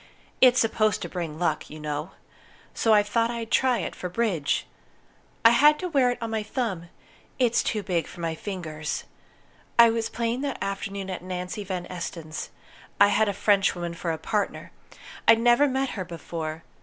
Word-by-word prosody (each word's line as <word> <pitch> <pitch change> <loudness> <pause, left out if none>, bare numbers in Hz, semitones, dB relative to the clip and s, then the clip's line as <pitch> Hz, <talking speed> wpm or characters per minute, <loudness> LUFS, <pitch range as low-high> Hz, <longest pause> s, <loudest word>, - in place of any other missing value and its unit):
It's 255 -1 +7
supposed 215 -1 +1
to - - -3
bring 165 -4 -4
luck, 160 -3 -1
you 155 - -9
know. 150 +3 -4 0.6
So 225 - +1
I 210 -1 +6
thought 230 +3 +1
I'd 235 -1 -5
try 255 -2 +3
it, - - -5
for 180 - -5
bridge. 180 -8 0 0.8
I 230 - +10
had 295 +5 +6
to 365 - -3
wear 275 -7 +3
it 245 - -1
on 225 - -3
my 220 -1 0
thumb; 210 -7 -3 0.5
it's 240 -3 +3
too 210 -2 -2
big 180 -4 -1
for - - -12
my 165 -1 -2
fingers. 160 -5 -5 0.7
I 235 -1 +8
was 225 0 -1
playing 235 +2 -2
that 280 -1 -2
afternoon 195 0 -4
at 185 - -5
Nancy 180 +2 -4
Van 185 -2 -4
Esten's. 170 -3 -6 0.5
I 200 0 +7
had 220 0 +3
a - - +1
Frenchwoman 195 -4 +1
for 170 0 -3
a 160 - -2
partner. 205 +5 -2 0.6
I'd 225 0 +7
never 240 +5 +5
met 265 0 0
her 190 - -4
before. 165 -2 -6
200 Hz, 180 wpm, -26 LUFS, 170-230 Hz, 0.8 s, I